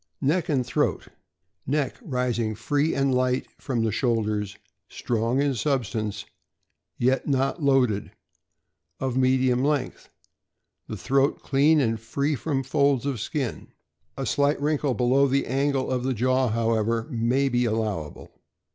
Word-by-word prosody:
Neck 160 +5 +1
and 135 -5 +1
throat. 125 - -1 0.3
— 95 0 -43
Neck 145 +1 0
rising 125 - -1
free 145 +7 0
and 135 -1 +1
light 125 0 +1
from 120 -4 -1
the 110 - +1
shoulders, 105 -4 -1 0.3
strong 115 +2 -1
in 140 -1 +2
substance, 115 -5 -2 0.7
yet 130 +2 +1
not 135 +3 0
loaded, 130 -7 +2 0.9
of 130 -2 -2
medium 130 -1 +2
length. 145 -2 -1 0.8
The - - -5
throat 135 +1 +1
clean 150 +3 +3
and 115 -5 0
free 140 +6 -1
from 135 0 -2
folds 140 -1 +1
of 135 -5 -2
skin; 135 -3 -3 0.5
a 135 - -3
slight 145 +2 +1
wrinkle 145 -2 0
below 130 +3 +3
the 140 +1 +1
angle 135 0 0
of 125 -1 0
the 130 0 -1
jaw, 130 +3 +2
however, 115 0 0
may 120 +4 +1
be 125 -1 +1
allowable. 110 -9 -3
130 Hz, 140 wpm, -25 LUFS, 115-140 Hz, 0.9 s, clean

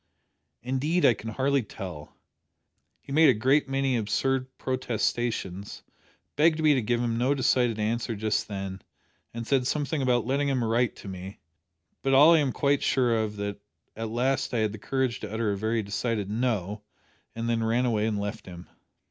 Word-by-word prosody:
"Indeed 140 +8 +1
I 120 - +6
can 110 +1 -7
hardly 135 +4 +1
tell. 90 -8 -9 0.8
He - - -12
made 155 +1 +6
a 130 - +4
great 135 +6 +2
many 135 -1 +1
absurd 130 +5 0
protestations, 120 -6 -2 0.5
begged 155 +2 +3
me 155 -1 +5
to 130 - +1
give 120 +2 0
him 115 -1 -1
no 130 +4 +2
decided 125 -3 +2
answer 115 +2 -1
just 110 +1 -1
then, 95 -2 -5 0.5
and 115 0 -6
said 130 0 +1
something 150 +1 -1
about 125 -3 +2
letting 140 +3 0
him 130 -3 0
write 115 +1 +1
to - - -11
me, 95 +1 -7 0.6
but 135 +1 +2
all 150 +5 +8
I 165 - +5
am 140 -3 +1
quite 140 +1 +1
sure 125 -4 +2
of 110 -2 -1
is - - -13
that 100 0 -4 0.4
at 115 0 -4
last 130 +2 0
I - - +2
had 110 -2 +1
the 110 - -8
courage 130 +1 -1
to 105 - -7
utter 110 -1 0
a - - -1
very 110 +2 -1
decided 105 0 -2
No, 105 -4 -1 0.5
and 115 +1 -3
then 115 -1 0
ran 115 +3 +1
away 110 -3 +1
and 110 -2 -1
left 100 -1 -5
him." 90 -1 -10
120 Hz, 185 wpm, -27 LUFS, 105-135 Hz, 0.8 s, all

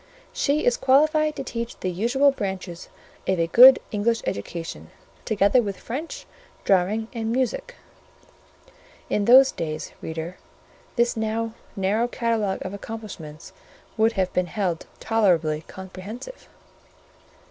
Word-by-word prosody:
"She 295 +1 +1
is 245 -1 +3
qualified 305 +3 +3
to - - -4
teach 235 -2 -5
the 185 - -2
usual 245 +10 +3
branches 190 -7 -5 0.4
of 190 -2 +1
a 165 - +3
good 250 +10 +9
English 225 +2 0
education, 165 +11 -5 0.4
together 215 +3 +3
with 200 -4 -4
French, 285 +8 -6 0.4
Drawing, 200 +4 +2
and 225 -1 -2
Music" 485 - -2 1.4
(in 205 - +1
those 260 +3 +7
days, 155 -1 -5
reader, 160 +3 -5 0.6
this 235 0 +2
now 225 0 -2 0.2
narrow 205 +4 +1
catalogue 225 -6 -1
of 185 - -5
accomplishments, 200 -8 -8 0.4
would 225 +1 +3
have 190 -3 -1
been 180 -1 +1
held 180 -3 -2
tolerably 170 -9 +1
comprehensive). 190 - -9
220 Hz, 120 wpm, -24 LUFS, 185-240 Hz, 1.4 s, good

